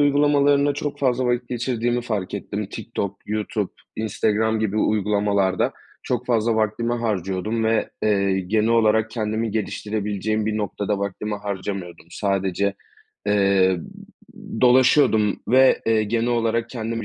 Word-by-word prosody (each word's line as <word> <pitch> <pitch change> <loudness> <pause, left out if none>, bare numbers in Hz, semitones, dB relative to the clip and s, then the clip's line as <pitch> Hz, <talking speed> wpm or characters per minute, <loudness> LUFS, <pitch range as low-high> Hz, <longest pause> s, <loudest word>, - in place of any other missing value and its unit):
uygulamalarında 145 0 +3
çok 145 0 -4
fazla 130 -2 +1
vakit 120 0 0
geçirdiğimi 120 0 -1
fark 105 -6 -3
ettim. - - -4
Tiktok, 100 0 -5
YouTube, 105 -1 -2 0.2
Instagram 110 +1 0
gibi 110 -1 -1
uygulamalarda 100 -3 +1 0.3
çok 125 0 -2
fazla 115 -1 +2
vaktimi 110 +2 0
harcıyordum 105 0 -2
ve, 110 0 +1
eee, 100 -2 +2
genel 105 +4 +1
olarak 110 -1 +3
kendimi 110 0 -2
geliştirebileceğim 105 0 -2
bir 110 0 -1
noktada 105 0 -2
vaktimi 100 +2 -3
harcamıyordum. 95 -4 -5
Sadece, 100 0 -1 0.5
eee, 95 -2 +3 0.6
m - - -8
dolaşıyordum 125 -4 +4
ve, 130 +1 +5
eee, 110 -1 +3
genel 115 +2 0
olarak 115 -1 0
kendime 115 -2 -4
110 Hz, 125 wpm, -22 LUFS, 100-115 Hz, 0.6 s, ve